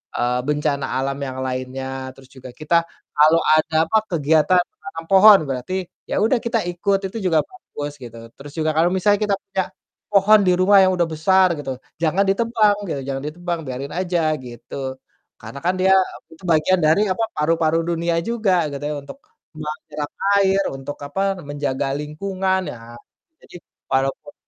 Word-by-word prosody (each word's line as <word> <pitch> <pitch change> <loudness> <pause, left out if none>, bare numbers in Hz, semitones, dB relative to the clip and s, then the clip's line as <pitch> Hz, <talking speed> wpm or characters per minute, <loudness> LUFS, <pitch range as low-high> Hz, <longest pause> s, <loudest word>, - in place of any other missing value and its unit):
eee, 125 +1 0
bencana 150 -1 0 0.2
alam 135 0 -2
yang 130 0 -6
lainnya 130 +1 -4 0.3
terus 135 -1 -17
juga 130 -1 -11
kita 165 +2 +1 0.3
kalau 155 +3 +5
ada 155 +1 +2
apa, 165 +7 +1
kegiatan 160 +1 +3
menanam 165 +1 -9
pohon, 195 +1 +8
berarti 130 +7 -3 0.3
ya - - -3
udah 235 +3 +2
kita 235 0 -1
ikut, 195 +3 0
itu - - -6
juga 165 -4 +3
bagus 145 - -8
gitu, 120 -3 -10 0.2
terus 140 +1 -11
juga 155 -1 0
kalau 165 +2 +4
misalnya 205 +2 +2
kita 200 - +2
punya 195 -1 -2 0.4
pohon 210 +1 +5
di 180 - +4
rumah 190 +2 +5
yang 185 -1 +4
udah 175 - +2
besar 180 +3 +3
gitu, 135 -3 -4 0.2
jangan 170 +4 +2
ditebang 210 +1 +2
gitu, 140 -5 -3
jangan 135 0 -4
ditebang 175 +2 -4
biarin 130 +2 -5
aja 175 -3 0
gitu, 130 +2 -7 0.4
karena 140 - -9
kan 180 - +3
dia 190 +1 +4
apa 190 -1 0
tu - - -21
bagian 165 +3 +3
dari 155 +5 +4
apa 225 +5 -1
paru-paru 160 +1 +1
dunia 170 0 -1
juga 215 -7 +1
gitu 140 - -6
ya, 150 - -3
untuk 140 - -11 0.4
menyerap 150 -1 -6 0.3
air 195 0 +3
untuk 135 +2 -7
apa, 170 +7 -3 0.2
menjaga 145 -2 -3
lingkungan, 190 +5 -2
ya 115 -1 -11 0.5
jadi, - - -16 0.4
walaupun, 135 +2 -1
160 Hz, 165 wpm, -21 LUFS, 140-190 Hz, 0.5 s, pohon